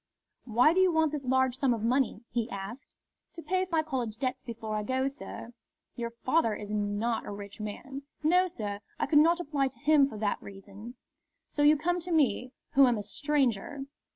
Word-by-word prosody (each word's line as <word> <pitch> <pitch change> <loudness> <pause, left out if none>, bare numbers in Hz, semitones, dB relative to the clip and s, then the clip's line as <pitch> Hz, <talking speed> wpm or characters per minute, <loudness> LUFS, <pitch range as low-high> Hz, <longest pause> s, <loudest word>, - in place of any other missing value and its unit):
"Why 250 +6 +4
do 370 - +2
you 375 -1 +5
want 320 -2 +2
this 295 -3 -4
large 260 0 +2
sum 260 -3 +2
of 220 - -6
money?" 245 -1 +1
he 235 0 -1
asked. 200 +7 -8 0.4
"To 335 -1 -9
pay 370 0 0
my 320 -1 +2
college 250 -8 -3
debts 255 +1 -2
before 225 -3 -5
I 210 - 0
go, 260 +4 0
sir." 275 -4 -8 0.4
"Your 235 -1 -3
father 235 0 +1
is 210 0 -7
not 210 +2 -1
a - - -4
rich 200 +1 -8
man." 265 +6 -6 0.2
"No, 360 +4 +4
sir. 210 - -5 0.2
I - - +1
could 295 - +5
not 335 +3 +4
apply 290 -5 0
to 265 - -9
him 295 -1 +5
for 220 - -8
that 205 -1 -1
reason." 200 +4 -11 0.5
"So 290 - -2
you 300 +1 +6
come 350 +4 0
to 355 +1 -6
me, 255 -6 +2 0.2
who 275 -1 +7
am 240 -2 +2
a 205 - -4
stranger!" 270 +1 -1
260 Hz, 200 wpm, -29 LUFS, 220-300 Hz, 0.5 s, who